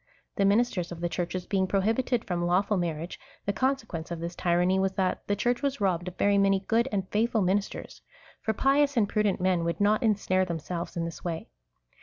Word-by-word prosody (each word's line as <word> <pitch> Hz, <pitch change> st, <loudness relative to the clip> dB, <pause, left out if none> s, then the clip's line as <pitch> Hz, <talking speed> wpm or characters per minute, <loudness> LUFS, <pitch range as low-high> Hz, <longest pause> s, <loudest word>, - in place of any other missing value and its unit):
The 200 Hz, -, +2 dB
ministers 200 Hz, -4 st, +2 dB
of 170 Hz, -, -6 dB
the 175 Hz, 0 st, -1 dB
Churches 180 Hz, +1 st, -3 dB
being 190 Hz, -1 st, 0 dB
prohibited 225 Hz, +5 st, +1 dB
from 175 Hz, -1 st, -1 dB
lawful 190 Hz, +4 st, +2 dB
marriage, 170 Hz, -2 st, -3 dB, 0.3 s
the 200 Hz, -, 0 dB
consequence 225 Hz, -10 st, -1 dB
of 170 Hz, -1 st, -4 dB
this 170 Hz, +1 st, -5 dB
tyranny 180 Hz, +2 st, +2 dB
was, 190 Hz, 0 st, +1 dB
that 185 Hz, -1 st, 0 dB
the 205 Hz, -, +1 dB
Church 240 Hz, +4 st, 0 dB
was 280 Hz, -2 st, -1 dB
robbed 180 Hz, -3 st, 0 dB
of 180 Hz, -, -7 dB
very 200 Hz, 0 st, +3 dB
many 195 Hz, -1 st, +3 dB
good 230 Hz, +5 st, +1 dB
and 195 Hz, -2 st, -1 dB
faithful 220 Hz, 0 st, +1 dB
minis 195 Hz, +2 st, +1 dB
ters; -, -, -9 dB, 0.4 s
for 220 Hz, -, 0 dB
pious 280 Hz, +4 st, +2 dB
and 210 Hz, -3 st, +4 dB
prudent 210 Hz, -1 st, +1 dB
men 180 Hz, -2 st, +1 dB
would 170 Hz, 0 st, -2 dB
not 210 Hz, +1 st, +3 dB
insnare 200 Hz, -4 st, +2 dB
them 170 Hz, -3 st, -2 dB
selves 170 Hz, +2 st, -5 dB
in 165 Hz, -, -1 dB
this 165 Hz, -, -7 dB
Avay. 165 Hz, -, -4 dB
190 Hz, 210 wpm, -28 LUFS, 175-215 Hz, 0.4 s, and